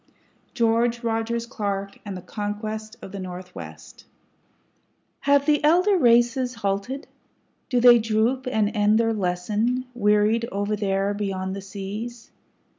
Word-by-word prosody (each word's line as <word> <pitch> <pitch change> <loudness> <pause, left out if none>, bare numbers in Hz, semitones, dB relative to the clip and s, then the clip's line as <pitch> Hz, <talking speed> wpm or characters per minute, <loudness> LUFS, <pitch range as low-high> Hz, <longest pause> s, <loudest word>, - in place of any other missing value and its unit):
GEORGE 235 0 +1
ROGERS 230 0 -1
CLARK 200 -4 -4
AND 200 -3 -6
THE 180 - -10
CONQUEST 215 +2 -5
OF - - -8
THE 200 - -6
NORTHWEST 180 - -9 1.1
Have 280 0 +3
the 295 -1 +2
elder 360 +7 +4
races 245 -2 +3
halted? 210 +5 -3 0.6
Do 250 -3 +2
they 240 -1 +8
droop 225 +4 0
and 220 -2 0
end 210 +1 +4
their 225 0 +2
lesson, 210 +6 -1
wearied 215 +1 +2
over 205 +2 -1
there 195 -1 0
beyond 190 -2 -3
the 200 - -6
seas? 205 +5 -7
215 Hz, 125 wpm, -24 LUFS, 200-240 Hz, 1.1 s, they